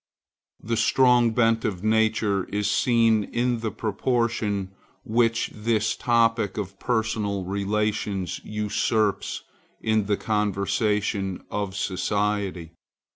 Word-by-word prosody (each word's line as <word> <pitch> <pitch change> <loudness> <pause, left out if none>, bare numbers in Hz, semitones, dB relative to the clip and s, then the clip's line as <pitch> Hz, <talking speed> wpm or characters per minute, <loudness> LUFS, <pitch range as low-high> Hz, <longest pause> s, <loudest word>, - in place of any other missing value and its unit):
The 115 +1 -2
strong 120 +1 +4
bent 115 0 +2
of 95 -3 -3
nature 110 -3 +2
is 105 0 -2
seen 115 -3 +3
in 120 +2 -1
the 110 -1 -2
proportion 110 -2 -1 0.3
which 115 -1 +1
this 110 0 0
topic 115 -4 +1
of 95 -2 -5
personal 110 -4 -1
relations 100 0 -2
usurps 105 0 -1 0.4
in 110 -2 +1
the 105 -1 +1
conversation 105 -1 -1
of 100 -2 -3
society. 100 -3 -1
105 Hz, 100 wpm, -25 LUFS, 100-115 Hz, 0.4 s, strong